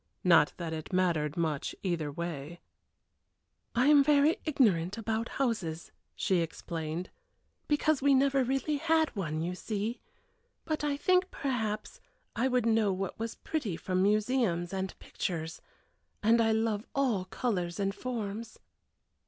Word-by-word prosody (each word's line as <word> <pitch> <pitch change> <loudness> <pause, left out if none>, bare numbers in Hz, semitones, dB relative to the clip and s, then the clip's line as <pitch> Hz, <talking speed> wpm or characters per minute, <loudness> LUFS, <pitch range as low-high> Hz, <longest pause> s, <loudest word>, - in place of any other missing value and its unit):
Not 170 -4 +5
that 165 -2 -4
it 155 -1 -6
mattered 170 -4 +1
much 155 -4 -1
either 165 -6 -1
way. 170 0 -5 1.2
"I 245 +2 +3
am 290 -1 +7
very 295 +2 +4
ignorant 205 - +2
about 225 +1 -2
houses," 195 -11 -1 0.2
she 190 - +1
explained, 165 0 -3 0.6
"because 295 -1 +2
we 280 0 +5
never 275 0 +3
really 270 +4 0
had 320 -1 +2
one, 160 -5 -2
you 175 +2 -2
see, 215 +4 -3 0.6
but 310 -2 -2
I 290 -1 0
think, 365 +4 +3
perhaps, 220 -7 -3 0.3
I 245 +3 +2
would 250 -3 +1
know 220 -3 +3
what 190 +1 -3
was 225 0 -3
pretty 230 - -3
from 185 +1 -1
museums 205 -4 +1
and 190 0 -3
pictures 160 -2 -4 0.6
and 230 +2 +5
I 225 -1 +3
love 220 -1 0
all 245 -9 +1
colors 185 -5 -2
and 195 0 0
forms." 225 -1 -5
215 Hz, 135 wpm, -30 LUFS, 175-260 Hz, 1.2 s, am